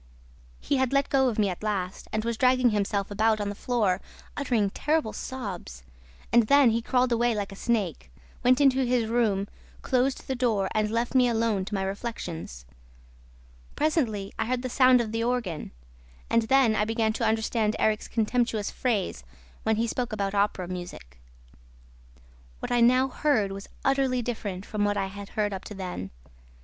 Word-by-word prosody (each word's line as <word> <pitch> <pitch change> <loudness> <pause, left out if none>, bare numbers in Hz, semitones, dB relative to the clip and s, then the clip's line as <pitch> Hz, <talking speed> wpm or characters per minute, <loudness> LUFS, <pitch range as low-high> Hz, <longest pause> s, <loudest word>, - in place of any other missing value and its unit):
"He 280 - 0
had 260 0 +1
let 275 0 +2
go 265 -2 +3
of 225 - -4
me 210 -2 +3
at 180 - -5
last 195 -4 -3
and 215 +1 -2
was 235 0 -1
dragging 255 0 +3
himself 200 -1 -1
about 215 +1 +2
on 205 -1 -2
the - - -3
floor, 210 -4 0 0.3
uttering 235 -8 0
terrible 300 -5 0
sobs. 190 - -6 0.5
And 235 -2 +5
then 280 -3 +6
he 230 +1 0
crawled 250 +1 +1
away 235 0 +2
like 205 -2 -3
a - - -8
snake, 195 - -2 0.3
went 250 +2 +4
into 270 -2 +4
his 245 -2 +1
room, 215 -4 +1 0.4
closed 260 +1 0
the 265 - -1
door 225 -7 0
and 215 0 +1
left 230 +3 -1
me 255 -2 +5
alone 225 -4 0
to 210 - -4
my 195 - -1
reflections. 180 - -5 1.1
Presently 235 - 0
I - - 0
heard 250 0 -1
the 255 - -2
sound 255 0 +5
of 220 -2 -4
the 225 0 -1
organ; 230 -10 -2 0.6
and 230 - +4
then 265 -5 +4
I 210 - +2
began 220 0 0
to 230 - -3
understand 220 -1 +1
Erik's 215 -1 +1
contemptuous 225 -2 0
phrase 220 -7 -1 0.4
when 220 0 +1
he 225 +2 +1
spoke 245 +1 -2
about 200 -2 -2
Opera 200 -3 0
music. 175 - -8 1.4
What - - -6
I 240 -1 +3
now 255 +3 +5
heard 250 -7 +1
was 195 +1 -8 0.2
utterly 270 -2 +2
different 205 -5 -4
from 210 -1 -2
what 205 0 +1
I 195 - 0
had 200 +1 -8
heard 210 -1 -1
up 190 - -6
to 210 - -8
then. 180 - -5
220 Hz, 180 wpm, -27 LUFS, 200-250 Hz, 1.4 s, then